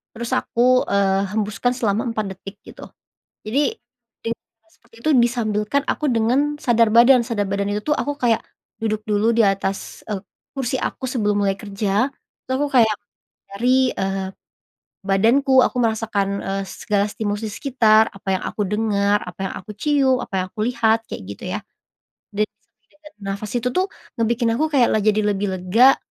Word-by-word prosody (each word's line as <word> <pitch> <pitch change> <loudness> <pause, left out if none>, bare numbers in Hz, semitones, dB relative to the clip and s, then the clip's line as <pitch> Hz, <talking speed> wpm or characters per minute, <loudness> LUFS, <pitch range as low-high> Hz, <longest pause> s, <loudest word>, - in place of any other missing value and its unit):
terus 235 +1 -5
aku, 255 +2 +3
eee, 195 -1 +2
hembuskan 215 +3 0
selama 225 +1 0
4 215 -2 -2
detik, 195 +2 -10
gitu. - - -11 0.6
Jadi, 285 - +1 0.5
dari 230 - -1
hal 220 -1 -41
seperti - - -27
itu 310 - +3
disambilkan 235 +1 +1
aku 300 - -1
dengan, 255 +6 +2
sadar 235 -4 +3
badan. 240 +1 +7
Sadar 205 -4 -1
badan 200 0 -1
itu 210 +1 -2
tuh - - -3
aku 290 0 -1
kayak, 235 -3 +2 0.4
duduk 215 -1 -1
dulu 210 +2 +2
di 230 - +4
atas, 195 0 -2
eee, 195 -2 -3 0.3
kursi 260 -1 -1
aku - - -4
sebelum 210 -4 0
mulai 195 0 +1
kerja. 205 +3 0 0.4
Terus 260 - -1
aku 290 - +1
kayak 220 -3 +4 0.6
dari, 255 +3 +3
eee, 195 0 -2 0.8
badanku, 260 +7 +4
aku - - -1
merasakan, 210 -3 0
eee, 195 0 -2
segala 205 0 -1
stimulus 210 0 -3
di 210 - -4
sekitar, 220 -5 +3
apa 195 -1 -2
yang - - -9
aku 210 - -4
dengar, 205 -1 +1
apa 180 +1 -10
yang - - -7
aku 200 +3 -10
cium, 275 -1 +2
apa - - -12
yang - - -4
aku 215 - -5
lihat, 225 -2 +2
kayak - - -6
gitu 100 - -9
ya. - - -2 0.7
Dari 210 +1 +1
setiap 215 +1 -48
detik 300 - -30
dari 300 -8 -15
nafas 200 +1 -4
itu 245 +1 0
tuh, 370 +1 +1 0.3
ngebikin 230 +1 +1
aku 310 - +2
kayak 255 -4 +4
la 215 - +2
jadi 215 0 +3
lebih 200 0 -1
lega, 230 +9 +5
220 Hz, 175 wpm, -21 LUFS, 200-245 Hz, 0.8 s, badan